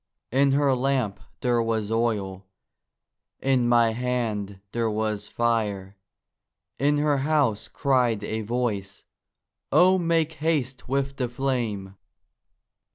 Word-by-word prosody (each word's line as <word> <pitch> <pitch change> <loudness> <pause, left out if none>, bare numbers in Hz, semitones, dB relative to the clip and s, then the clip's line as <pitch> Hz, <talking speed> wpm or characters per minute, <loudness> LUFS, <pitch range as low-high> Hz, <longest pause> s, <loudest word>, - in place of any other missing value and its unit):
In 135 +2 +3
her 140 -1 +3
lamp 130 -5 0 0.2
there 120 -2 +2
was 110 -2 -1
oil, 100 -5 -1 0.9
in 130 -3 +2
my 120 -1 +4
hand 110 -5 -2
there 115 -1 0
was 105 -1 -2
fire; 105 -5 -1 0.8
In 145 +1 +3
her 145 -1 +2
house 140 -7 +1
cried 125 -6 +1
a 110 0 -3
voice, 105 -4 -3 0.7
'O 185 +1 +5
make 165 -2 +1
haste 135 -6 -1
with 135 0 -1
the 125 -3 -1
flame! 115 -7 -2
120 Hz, 110 wpm, -25 LUFS, 110-135 Hz, 0.9 s, O